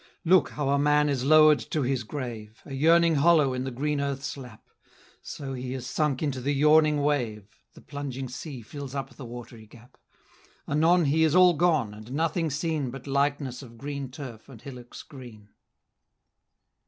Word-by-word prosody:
Look 175 Hz, -3 st, +4 dB
how 145 Hz, -2 st, -3 dB
a 140 Hz, 0 st, +2 dB
man 150 Hz, +1 st, +3 dB
is 135 Hz, -3 st, -1 dB
lower'd 155 Hz, 0 st, +6 dB
to 150 Hz, -, -1 dB
his 130 Hz, -1 st, -1 dB
grave, 110 Hz, -4 st, -7 dB
A 140 Hz, -, -9 dB
yearning 165 Hz, +4 st, +4 dB
hollow 150 Hz, -3 st, +4 dB
in 130 Hz, 0 st, -3 dB
the -, -, -2 dB
green 145 Hz, +3 st, -2 dB
earth's 140 Hz, -1 st, -3 dB
lap; 125 Hz, -5 st, -12 dB, 0.5 s
So 135 Hz, -2 st, -7 dB
he 125 Hz, 0 st, -5 dB
is 130 Hz, -2 st, -6 dB
sunk 150 Hz, +1 st, -1 dB
into 135 Hz, -4 st, -2 dB
the 140 Hz, +3 st, -1 dB
yawning 150 Hz, 0 st, +4 dB
wave, 120 Hz, -9 st, -1 dB, 0.3 s
The -, -, -15 dB
plunging 135 Hz, -2 st, -6 dB
sea 125 Hz, 0 st, -8 dB
fills 140 Hz, +3 st, -8 dB
up 135 Hz, -, -4 dB
the 135 Hz, -, -11 dB
watery 115 Hz, -2 st, -10 dB
gap; 120 Hz, +3 st, -18 dB, 0.7 s
Anon 165 Hz, +4 st, +3 dB
he 155 Hz, +3 st, +2 dB
is 160 Hz, 0 st, +2 dB
all 180 Hz, -1 st, +7 dB
gone, 155 Hz, -10 st, +1 dB
and 110 Hz, +4 st, -10 dB
nothing 165 Hz, +2 st, 0 dB
seen 150 Hz, -2 st, -2 dB
But 135 Hz, +1 st, -9 dB
likeness 140 Hz, -2 st, -1 dB
of 120 Hz, -3 st, -13 dB
green 140 Hz, 0 st, -5 dB
turf 125 Hz, -3 st, -10 dB
and 125 Hz, -5 st, -12 dB
hillocks 125 Hz, -1 st, -10 dB
green. 120 Hz, -7 st, -13 dB
140 Hz, 175 wpm, -26 LUFS, 125-150 Hz, 0.7 s, all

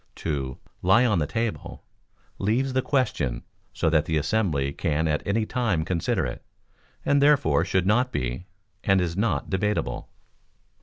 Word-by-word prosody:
To 70 Hz, -5 st, -3 dB, 0.2 s
"Lie 95 Hz, +7 st, +5 dB
on 105 Hz, -7 st, +2 dB
the 75 Hz, -, 0 dB
Table" 115 Hz, +4 st, -3 dB, 0.6 s
leaves 125 Hz, +7 st, +1 dB
the 130 Hz, -, +2 dB
question 75 Hz, -, -1 dB, 0.3 s
so -, -, -1 dB
that 80 Hz, -2 st, +3 dB
the 80 Hz, -, 0 dB
assembly 75 Hz, -5 st, 0 dB
can 80 Hz, +1 st, 0 dB
at 75 Hz, 0 st, 0 dB
any 110 Hz, +2 st, +1 dB
time 110 Hz, -11 st, 0 dB
consider 85 Hz, -2 st, 0 dB
it, -, -, -6 dB, 0.6 s
and 140 Hz, 0 st, +3 dB
therefore 145 Hz, -2 st, +4 dB
should 95 Hz, -1 st, 0 dB
not 120 Hz, +6 st, +2 dB
be, 65 Hz, -, -3 dB, 0.4 s
and 95 Hz, -1 st, +3 dB
is 85 Hz, -2 st, -1 dB
not 100 Hz, -8 st, -1 dB
debatable. 105 Hz, +2 st, -1 dB
95 Hz, 150 wpm, -25 LUFS, 80-115 Hz, 0.6 s, Lie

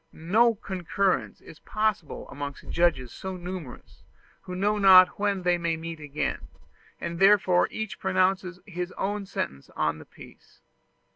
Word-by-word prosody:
No 220 Hz, +8 st, +3 dB
concurrence 195 Hz, -1 st, -1 dB
is 160 Hz, -, -14 dB
possible 215 Hz, -7 st, -2 dB
amongst 145 Hz, 0 st, -7 dB
judges 150 Hz, -8 st, +1 dB
so 190 Hz, -1 st, -6 dB
numerous, 175 Hz, -7 st, -8 dB, 0.4 s
who 180 Hz, -, -7 dB
know 205 Hz, +3 st, +1 dB
not 185 Hz, -2 st, +7 dB
when 200 Hz, -2 st, 0 dB
they 175 Hz, -1 st, +2 dB
may 170 Hz, -1 st, -1 dB
meet 165 Hz, 0 st, -7 dB
again; 150 Hz, 0 st, -3 dB, 0.5 s
and 170 Hz, 0 st, -5 dB
therefore 195 Hz, -2 st, +5 dB
each 220 Hz, -2 st, -5 dB
pronounces 185 Hz, -1 st, 0 dB
his 180 Hz, -2 st, -5 dB
own 200 Hz, 0 st, -3 dB
sentence 70 Hz, -, -5 dB
on 75 Hz, 0 st, 0 dB
the 75 Hz, -, -12 dB
piece. -, -, -17 dB
180 Hz, 140 wpm, -26 LUFS, 165-195 Hz, 0.5 s, not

